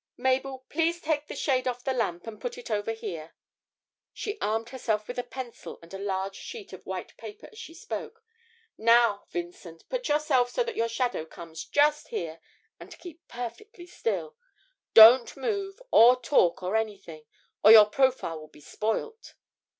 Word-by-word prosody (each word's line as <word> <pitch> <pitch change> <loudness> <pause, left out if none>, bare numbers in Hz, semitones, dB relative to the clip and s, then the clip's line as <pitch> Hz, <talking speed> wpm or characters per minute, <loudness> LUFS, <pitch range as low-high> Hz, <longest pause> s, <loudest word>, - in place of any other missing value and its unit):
'Mabel, 260 +1 -1
please 335 +2 0
take 305 -2 -2
the - - -7
shade 260 -3 0
off 245 -1 -3
the 265 - -1
lamp 175 -8 -2
and 225 -2 -9
put 485 -1 -5
it 485 - -9
over 210 +1 -1
here.' 165 -8 -7 0.8
She 415 0 -5
armed 225 +2 -1
herself 220 -5 -2
with 245 0 -5
a - - -1
pencil 255 -3 -8
and 165 - -15
a 195 - -6
large 195 -1 -3
sheet 430 - -9
of - - -12
white - - -6
paper 420 +1 -10
as 435 - -14
she 460 -8 -10
spoke. 455 +6 -7 0.6
'Now, 230 -2 +4
Vincent, 175 -1 -8
put - - -3
yourself 295 -5 +2
so 485 - 0
that 470 -2 -5
your 230 -7 0
shadow 240 -6 -1
comes 160 0 -10
just 300 +1 +2
here, 165 -1 -5 0.4
and - - -12
keep 345 -1 -13
perfectly 345 - -8
still. 465 +5 -3 0.6
Don't 235 +3 +9
move, 400 -2 -3
or 245 +3 +7
talk, 210 -9 +2
or 185 +4 -2
anything, 195 -8 -4 0.4
or 215 - +9
your 220 -2 +10
profile 250 -8 0
will 155 - -12
be 150 - -19
spoilt!' 225 - -4
245 Hz, 170 wpm, -27 LUFS, 205-320 Hz, 0.8 s, your